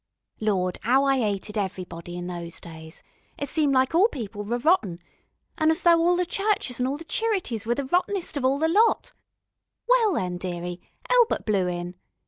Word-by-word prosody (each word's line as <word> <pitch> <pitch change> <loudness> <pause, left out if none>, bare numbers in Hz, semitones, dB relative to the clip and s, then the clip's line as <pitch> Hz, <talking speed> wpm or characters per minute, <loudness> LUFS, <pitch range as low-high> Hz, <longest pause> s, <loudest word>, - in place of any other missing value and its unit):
Lawd, 185 -4 0
'ow 260 +4 +4
I 275 -1 +3
'ated 210 -1 -2
everybody 175 -3 -5
in 175 - -5
those 170 -1 -6
days. 160 -1 -11 0.3
It 285 - -3
seemed 290 -1 +1
like 260 +2 +2 0.2
people 210 -5 -6
was 235 +5 -3
all 325 - +7
rotten, 200 - +1 0.6
an' 315 - +4
as 320 +3 +1
if - - -17
all 340 +1 +4
the 360 0 +1
churches 390 - -1
an' 250 - +1
all 275 +2 -2
the 325 - -9
cherities 355 - -2
was 240 - +2
the 280 - -3
rottenest 360 +5 -1
of 285 - -2
all 265 +2 +3
the 320 +2 +1
lot. 425 +7 +2 0.7
Well, 475 -5 +4
then, 180 - -2
dearie, 175 -1 -5 0.3
Elbert - - +3
blew 195 -4 +1
in. 175 0 -4
245 Hz, 185 wpm, -25 LUFS, -, 0.7 s, all